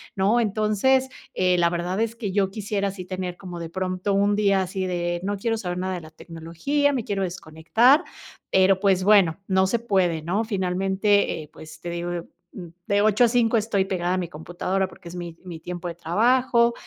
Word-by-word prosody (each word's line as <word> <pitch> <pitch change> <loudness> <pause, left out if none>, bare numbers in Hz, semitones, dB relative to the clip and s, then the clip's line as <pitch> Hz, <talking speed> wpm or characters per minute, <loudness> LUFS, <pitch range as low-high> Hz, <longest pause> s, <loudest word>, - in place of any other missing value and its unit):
¿no? 200 +5 +2
Entonces, 220 +5 +2 0.3
eh, 180 -1 +2
la 170 0 +4
verdad 175 +3 -2
es 230 0 -1
que 220 -5 -4
yo 195 0 +1
quisiera 200 -1 -2
sí 185 -2 -8
tener 185 -1 -5
como 180 -3 -8
de 165 -1 -6
pronto 185 +2 -2
un 200 +1 +2
día 200 -2 +2
así 185 +1 -3
de 175 -1 -2
no 200 +1 -1
quiero 225 +3 -1
saber 180 -4 -4
nada 185 +1 -2
de 175 - -6
la 155 - -12
tecnología, 170 - -2
me 250 -4 -1
quiero 200 -2 -2
desconectar, 185 - +2 0.5
pero, 190 0 +4
pues, 190 -2 +2
bueno, 195 -4 +4
no 190 0 +3
se 235 - +1
puede, 185 -8 +1
¿no? 190 +7 0
Finalmente, 195 -1 +1
eh, 150 - -16
pues, 155 0 -12
te 175 - -5
digo, 175 +1 -3
yo, 170 -1 -4 0.3
mm, 180 -3 -7 0.2
de 200 0 +2
8 215 +3 +4
a - - +4
5 235 -1 +2
estoy 210 -3 +1
pegada 180 -2 -1
a - - 0
mi 175 -3 -3
computadora, 175 +4 -2
porque 175 -2 -13
es 175 - -9
mi 170 -2 -7
mi 175 -3 -8
tiempo 175 +1 -6
de 170 - -7
trabajo, 235 +7 +2
190 Hz, 205 wpm, -24 LUFS, 175-210 Hz, 0.5 s, la